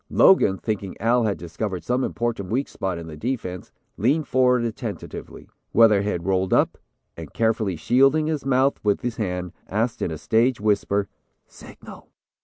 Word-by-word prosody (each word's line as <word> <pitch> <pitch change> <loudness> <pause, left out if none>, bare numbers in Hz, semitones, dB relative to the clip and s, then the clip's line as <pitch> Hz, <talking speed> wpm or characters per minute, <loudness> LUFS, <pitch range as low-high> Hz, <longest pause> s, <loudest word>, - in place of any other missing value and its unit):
Logan, 100 - +5
thinking 100 -2 -4
Al 115 +2 +2
had 105 -2 0
discovered 90 +3 -5
some 125 +2 0
important 115 -7 -2
weak 130 +6 0
spot 95 -3 -4
in 85 - -7
the 80 -1 -9
defense, 90 - -4 0.3
leaned 140 - +1
forward 125 -2 +3
attentively. 115 -2 -6 0.3
Weatherhead 105 -6 +3
rolled 95 -1 +1
up, - - +1 0.4
and 80 -3 -9
carefully 110 -4 0
shielding 135 - +3
his 155 -2 -2
mouth 135 +1 +2
with 105 -1 +1
his 120 -1 -3
hand, 90 -4 -3 0.2
asked 115 +4 -1
in - - 0
a 80 - -5
stage 115 - +1
whisper 100 -1 +1 0.4
'Signal.' - - -14
110 Hz, 155 wpm, -23 LUFS, 95-125 Hz, 0.4 s, Logan